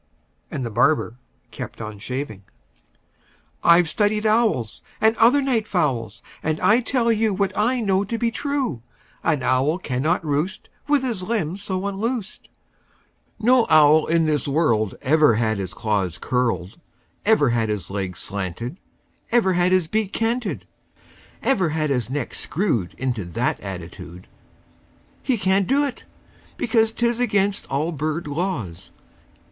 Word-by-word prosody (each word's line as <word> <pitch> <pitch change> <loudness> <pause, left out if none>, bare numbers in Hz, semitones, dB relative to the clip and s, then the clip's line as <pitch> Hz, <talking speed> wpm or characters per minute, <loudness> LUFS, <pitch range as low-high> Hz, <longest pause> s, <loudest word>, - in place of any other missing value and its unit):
And 130 - -4
the 115 - -4
barber 125 0 +1 0.3
kept - - -7
on 110 -2 -7
shaving. 125 -3 -5 1.2
"I've 170 0 +6
studied 210 +5 0
owls, 215 - +1 0.2
And 220 +1 +4
other 250 +5 +5
night 235 -5 0
fowls, 120 - -1 0.2
And 155 0 -1
I 205 +6 +4
tell 240 -1 +1
you 220 -2 +1
What 195 0 -1
I 240 +5 +1
know 195 -2 +2
to 230 +4 -3
be 230 0 0
true: 270 - -2 0.4
An 150 -5 +1
owl 135 +6 +2
cannot 160 +2 -1
roost 155 +6 -2 0.2
With 290 -2 +3
his 235 -7 -2
limbs 195 -3 -2
so 190 -2 -3
unloosed; 210 +2 -3 0.9
No 240 +2 +4
owl 155 0 +6
in 165 0 +2
this 150 -2 0
world 120 - +1
Ever 150 -3 +4
had 110 -2 0
his 95 -2 -5
claws 100 -6 -1
curled, 115 - -1 0.4
Ever 200 - +4
had 115 -2 0
his 100 -4 -3
legs 95 -3 -3
slanted, 100 - -5 0.5
Ever 230 -6 +3
had 175 +1 +2
his 185 -2 +3
bill 215 +5 0
canted, 225 +1 -2 0.8
Ever 195 -11 +2
had 155 -1 -1
his 125 -4 -1
neck 140 -1 -3
screwed 140 - -1
Into 125 -5 -2
that 85 -1 -1
attitude. 90 -1 -8 1.0
He 255 -3 0
can't 190 -1 +2
do 280 +3 +3
it, 265 -3 -6 0.5
because 225 -1 +2
'T 235 - -1
is 235 0 +1
against 205 -4 +1
all 150 +5 -1
bird 155 +2 -3
laws. 145 - -4
165 Hz, 145 wpm, -22 LUFS, -, 1.2 s, I've